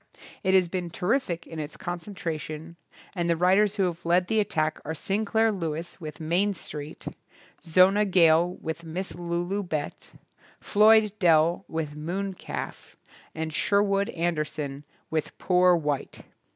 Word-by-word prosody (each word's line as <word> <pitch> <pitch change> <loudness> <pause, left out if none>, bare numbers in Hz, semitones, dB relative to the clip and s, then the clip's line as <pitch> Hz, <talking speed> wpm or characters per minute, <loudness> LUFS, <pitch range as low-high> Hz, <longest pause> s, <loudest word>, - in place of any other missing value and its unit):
It 190 -2 +2
has 185 -2 +5
been 175 0 -3
terrific 180 -1 -1
in 165 - -8
its 150 0 -6
concentration, 170 -3 -5 0.4
and 175 -2 -1
the 170 - +2
writers 195 +4 +3
who 200 - +1
have 175 -1 -2
led 175 +2 +3
the 220 +3 +1
at 210 -1 0
tack 155 -3 -1
are 160 +2 -4
Sinclair 220 +4 +1
Lewis 170 -2 -4
with 155 -2 -7
"Main 180 +6 +1
Street", 150 -2 -8 0.6
Zona 185 +5 +5
Gale 175 -2 +4
with 160 +1 -4
"Miss 175 +3 -4
Lulu 175 +3 -2
Bett", 155 -6 -5 0.5
Floyd 215 0 +5
Dell 170 +1 +3
with 155 -2 -4
"Moon 185 +6 -3
CalT*, - - -7 0.4
and 160 0 -3
Sherwood 200 +3 +2
Anderson 150 -4 -3 0.3
with 160 -1 -2
"Poor 180 -1 +4
White". 150 -4 -3
175 Hz, 140 wpm, -26 LUFS, 160-195 Hz, 0.6 s, has